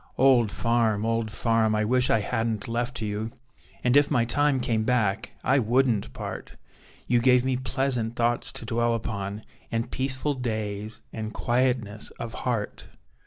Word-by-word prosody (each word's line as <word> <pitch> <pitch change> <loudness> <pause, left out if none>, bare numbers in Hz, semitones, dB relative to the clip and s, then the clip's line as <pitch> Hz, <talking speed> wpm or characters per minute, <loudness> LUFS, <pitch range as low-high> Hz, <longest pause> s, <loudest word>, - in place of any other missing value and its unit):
Old 125 -5 +5
farm! 115 -3 +1
Old 115 -1 0
farm! 110 0 +1
I 105 0 +1
wish 125 +3 +2
I 110 - +3
hadn't 110 0 -2
left 120 0 -2
you! 105 +1 -2 0.5
And 125 +1 +3
if 145 0 +5
my 115 -2 +2
time 145 +2 +2
came 115 -3 0
back, 110 -4 0
I 135 +1 +3
wouldn't 120 - +2
part: - - -7 0.5
You 120 - +3
gave 125 +1 +4
me 130 -1 +1
pleasant 130 -3 -1
thoughts 120 0 0
to - - -7
dwell 120 0 +1
upon, 105 -2 -4 0.3
And 115 0 -2
peaceful 130 +2 +1
days 110 -4 -3
and 110 -1 -4
quietness 120 -3 0
of 115 -1 -6
heart. 120 -5 -3
115 Hz, 155 wpm, -26 LUFS, 110-125 Hz, 0.5 s, Old